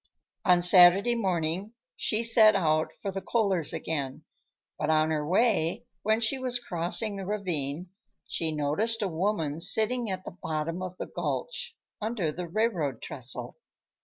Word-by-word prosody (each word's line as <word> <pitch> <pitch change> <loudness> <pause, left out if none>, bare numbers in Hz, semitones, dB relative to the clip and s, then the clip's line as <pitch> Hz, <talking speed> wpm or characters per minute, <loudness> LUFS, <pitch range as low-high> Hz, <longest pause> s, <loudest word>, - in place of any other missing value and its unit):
On 180 -1 +5
Saturday 180 +5 +7
morning 190 -1 -1 0.2
she 220 +1 +1
set 225 -2 +6
out 155 -4 +1
for 195 - -2
the 195 0 -5
Kohlers' 195 -9 +1
again, 140 -5 -4 0.6
but 150 - -1
on 155 0 +3
her 155 -1 -1
way, 185 0 +1 0.2
when 220 +2 +1
she 235 +4 +1
was 255 -1 -1
crossing 195 +2 0
the 195 - -5
ravine, 175 -5 -3 0.4
she 160 -1 -1
noticed 160 +10 0
a - - 0
woman 165 -4 -1
sitting 225 +6 +1
at 185 -1 -4
the - - -6
bottom 160 +3 -3
of 185 0 -6
the - - -4
gulch, - - -4 0.2
under 210 -7 -1
the 175 +3 -6
railroad 170 - -1
trestle. 130 -1 -7
185 Hz, 150 wpm, -28 LUFS, 160-215 Hz, 0.6 s, Saturday